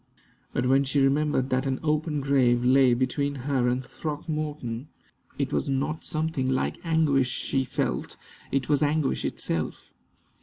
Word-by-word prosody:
But 125 - -1
when 135 +2 +4
she 140 +1 0
remembered 135 -1 +2
that 130 +1 +1
an 130 -1 -1
open 150 -1 0
grave 125 -3 +3
lay 130 -1 +5
between 140 +3 -1
her 135 -4 +1
and 125 +1 0
Throckmorton, 150 -5 -4 0.5
it - - -2
was - - 0
not 145 +4 -1
something 155 -4 -1
like 130 - -1
anguish 155 -6 +2
she 135 +1 -1
felt - - -2 0.3
it 135 -2 0
was 145 -1 +2
anguish 150 -1 +1
itself. 80 -1 -3
135 Hz, 145 wpm, -26 LUFS, 130-150 Hz, 0.5 s, lay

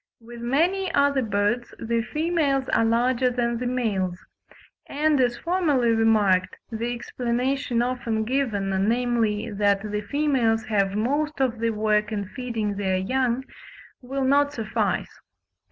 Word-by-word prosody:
With 235 0 -11
many 345 +10 +1
other 280 -1 +3
birds 210 +2 -1
the 230 0 -1
females 295 0 0
are 225 - +3
larger 240 +2 +2
than 235 -1 -1
the 250 - -2
males; 205 -8 -1 0.7
and, 295 -1 +1
as 245 -1 +1
formerly 310 -9 +1
remarked, 215 -5 +3 0.2
the 230 +2 -2
explanation 245 +1 -1
often 240 -3 -1
given, 225 -5 -1 0.2
namely, 235 -2 0
that 205 0 +1
the 210 0 -1
females 235 -2 +1
have 200 -2 0
most 290 +7 -1
of 250 -4 0
the 230 0 +1
work 215 0 +1
in 205 -2 -2
feeding 220 -4 -3
their 190 -2 0
young, 255 +5 0 0.6
will 270 +2 -3
not 285 +2 +3
suffice. 225 -5 -2
235 Hz, 135 wpm, -24 LUFS, 215-265 Hz, 0.7 s, other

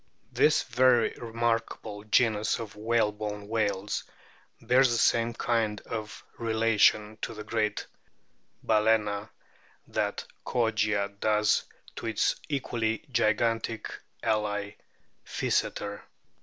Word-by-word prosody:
This 155 - +3
very 125 -1 +3
remarkable 115 -2 -2
genus 110 -1 +2
of 110 -3 -7
whalebone 105 -2 -1
whales 105 -2 -1 0.6
bears 130 +1 +4
the 120 - +1
same 115 0 +3
kind 115 -3 0
of 110 -2 -6 0.2
relation 110 -2 +3
to - - -4
the 105 - -7
great 105 -1 -1 0.8
Bala 110 0 +4
no, 105 -1 -4
o 100 +2 -6 0.6
that - - -2 0.2
Kogia 105 -4 +1
does 105 0 +2 0.3
to - - -4
its 110 -2 +1
equally 115 -5 -1
gigantic 115 -1 0 0.3
ally 105 -2 -1 0.5
Physeter. 100 0 -2
110 Hz, 100 wpm, -28 LUFS, 105-115 Hz, 0.8 s, bears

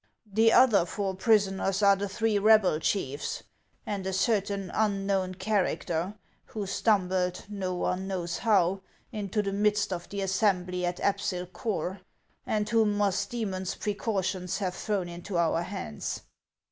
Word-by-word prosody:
The 225 +2 +5
other 230 -8 +6
four 195 +1 -2
prisoners 195 -2 +2
are 200 0 +7
the 200 +1 -3
three 215 +1 +1
rebel 210 -6 +5
chiefs, 145 -6 -2 0.4
and 200 -2 -3
a 190 - -2
certain 200 -1 0
unknown 195 -3 0
character, 185 -2 -1 0.3
who 210 -2 -5
stumbled, 185 -3 +1
no 190 -3 -3
one 180 +1 -1
knows 175 -3 -3
how, 195 -4 +2 0.3
into 210 0 -2
the 195 -1 -2
midst 210 -1 +1
of 175 -1 -6
the 200 0 -4
assembly 185 -2 +1
at 175 0 -3
Apsyl 200 -3 0
Corh, 190 -3 -3 0.5
and 210 -1 0
whom 220 -3 +2
Musdoemon's 200 -1 -1
precautions 190 -3 -2
have 185 -3 -2
thrown 200 -2 -2
into 175 +2 -5
our 165 0 +2
hands. 75 - -5
195 Hz, 135 wpm, -28 LUFS, 180-210 Hz, 0.5 s, are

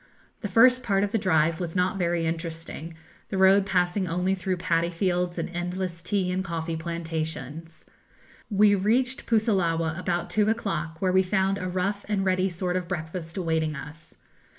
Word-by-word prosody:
The - - -3
first 250 +6 +5
part 200 -5 +1
of 205 - -1
the 225 - +1
drive 160 -4 +2
was 175 -2 -4
not 185 +1 +1
very 170 -1 +1
interesting, 165 0 -5 0.3
the 195 - -2
road 190 +1 +5
passing 180 +1 +1
only 180 +3 0
through 190 -1 -2
paddy 170 -1 +1
fields 175 0 -1
and - - -2
endless 175 0 -3
tea 185 0 0
and 185 +1 -1
coffee 165 -2 -3
plantations. 160 -1 -5 0.6
We 205 -1 +5
reached 240 +7 +1
Pusillawa 180 -8 +1
about 175 -1 -2
two 215 0 +2
o'clock, 170 -7 -2
where 185 - +3
we 190 +1 +5
found 190 +1 +1
a 185 - -3
rough 195 +3 -1
and 195 -2 0
ready 185 0 +2
sort 180 +1 -2
of 180 -2 -4
breakfast 165 0 -5
awaiting 160 -3 0
us. 155 +3 -10
180 Hz, 170 wpm, -26 LUFS, 165-195 Hz, 0.6 s, first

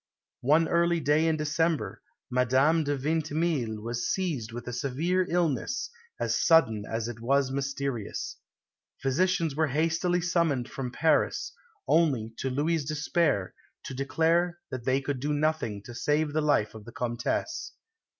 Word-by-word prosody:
One 155 +6 +4
early 170 0 +2
day 150 +2 +3
in 160 -1 +2
December, 155 +1 0 0.3
Madame 130 +6 +3
de 145 -1 -1
Vintimille 150 -5 -1
was 120 +1 -2
seized 150 - -1
with 120 +1 -7
a 125 - -4
severe 165 +9 0
illness, 175 - 0 0.3
as - - 0
sudden 115 -11 +4
as 115 0 -2
it 120 -2 -6
was 135 +3 +2
mysterious. 135 -4 -3 0.6
Physicians 165 +2 +1
were 160 +1 +2
hastily 165 +5 +1
summoned 165 -7 +1
from 130 -2 -4
Paris, 160 +4 +1 0.3
only, 135 -9 +2
to 135 - -2
Louis' 150 +4 0
despair, 150 - 0 0.3
to - - -6
declare 165 +6 +1
that 130 -2 -5
they 130 +1 +2
could 140 -1 -3
do 145 +3 -1
nothing 145 -9 -1
to 120 - -9
save 150 +4 0
the 155 - +1
life 145 -8 +2
of 110 -2 -11
the 120 - -9
Comtesse. 125 - -2
145 Hz, 145 wpm, -28 LUFS, 125-165 Hz, 0.6 s, One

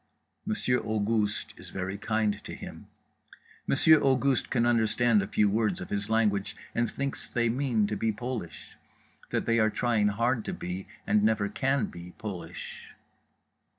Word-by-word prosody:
Monsieur 125 -13 +1
Auguste 105 -1 -1
is - - -11
very 95 +1 -4
kind 105 0 -1
to - - -7
him, - - -10 0.8
Monsieur 155 +2 +6
Auguste 135 0 +2
can 120 -2 +2
understand 115 -1 +3
a 100 - -3
few 105 0 +2
words 110 +1 +1
of - - -8
his 100 +1 -2
language 105 -3 +1 0.2
and 120 -1 +1
thinks 140 +3 -2
they 120 -1 0
mean 120 -3 +1
to 105 +1 -2
be 110 +1 0
Polish. 110 - -6 0.5
That - - -1
they 115 0 +2
are 110 0 +4
trying 110 -2 +1
hard 115 +3 +1
to - - -3
be 90 +2 -5 0.2
and 105 0 +3
never 110 -1 +2
can 135 +2 +1
be 85 +1 -10
Polish. 100 -5 -7
110 Hz, 155 wpm, -28 LUFS, 105-120 Hz, 0.8 s, Monsieur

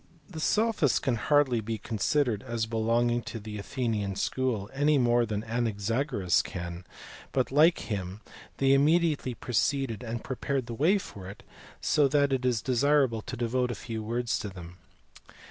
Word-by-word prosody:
The 165 -4 -8
sophists 210 - +2
can 130 - 0
hardly 130 -1 +2
be 110 +1 -3
considered 110 +2 0
as 115 -2 -2
belonging 115 +2 +1
to 115 - -6
the 105 0 -7
Athenian 105 -4 -2
school, 120 -3 -1
any 145 +2 +3
more 120 -2 +3
than 105 0 -3
Anaxagoras 115 - 0
can; 85 0 -7 0.5
but 130 -1 0
like 155 +5 +4
him 95 -1 -5 0.4
they 135 0 +4
immediately 150 -2 +2
preceded 125 0 -1
and 115 -1 -5
prepared 135 0 -2
the 120 - -6
way 160 - +3
for 95 - -8
it, 100 - -11 0.4
so 150 -2 +3
that 140 0 +2
it 130 -1 -1
is 120 -3 0
desirable 130 -2 +2
to 125 - -7
devote 125 +1 0
a 120 - -3
few 110 +1 -5
words 120 +2 -1
to 105 - -4
them. 90 -2 -11
120 Hz, 160 wpm, -28 LUFS, 110-135 Hz, 0.5 s, like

